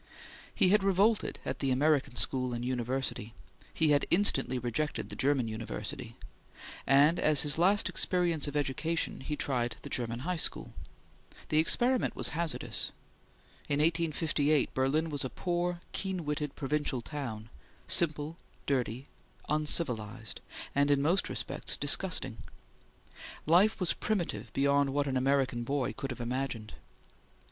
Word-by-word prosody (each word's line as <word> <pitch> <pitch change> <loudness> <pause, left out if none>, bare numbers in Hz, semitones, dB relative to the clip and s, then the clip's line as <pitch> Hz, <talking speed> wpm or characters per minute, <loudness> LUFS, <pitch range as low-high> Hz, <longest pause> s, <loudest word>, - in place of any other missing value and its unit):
He 185 - +4
had 210 +1 +4
revolted 195 +3 +2
at - - -4
the 135 - 0
American 140 0 +1
school 125 -2 +1
and 120 +1 -4
university; 125 -2 -3 0.4
he 160 -2 +2
had 145 -1 +3
instantly 140 -9 +4
rejected 125 +5 -2
the - - -7
German 135 -3 +1
university; 110 +2 -6 0.7
and 145 +5 +5
as 155 -2 +5
his 150 +1 +2
last 195 +4 +4
experience 170 -5 0
of 145 +1 -3
education 150 +3 -1
he 150 +3 -4
tried 120 -5 -1
the - - -9
German 120 -1 -2
high 180 +5 -2
school. - - -2 0.8
The 155 - +2
experiment 245 +10 +3
was - - -1
hazardous. 165 0 -2 0.8
In 140 - +1
1858 155 -2 +1
Berlin 150 +5 0
was 145 - -2
a 130 - -3
poor, 175 +5 -2
keen 190 -4 -3
witted, 150 -1 -3
provincial 140 -3 -2
town, 115 -7 -6 0.4
simple, 155 -1 +4 0.3
dirty, 130 -2 -1 0.4
uncivilized, 125 -8 -1 0.3
and 140 +1 +2
in 145 -1 +3
most 175 +6 +1
respects - - -3
disgusting. - - +2 1.1
Life 185 +8 +4
was 180 - +1
primitive 140 - -3
beyond 140 0 +2
what 145 0 +1
an 135 -2 -2
American 130 -1 +1
boy 135 0 -2
could 135 - -5
have 125 -1 -6
imagined. 120 -3 -4
145 Hz, 135 wpm, -30 LUFS, 130-165 Hz, 1.1 s, and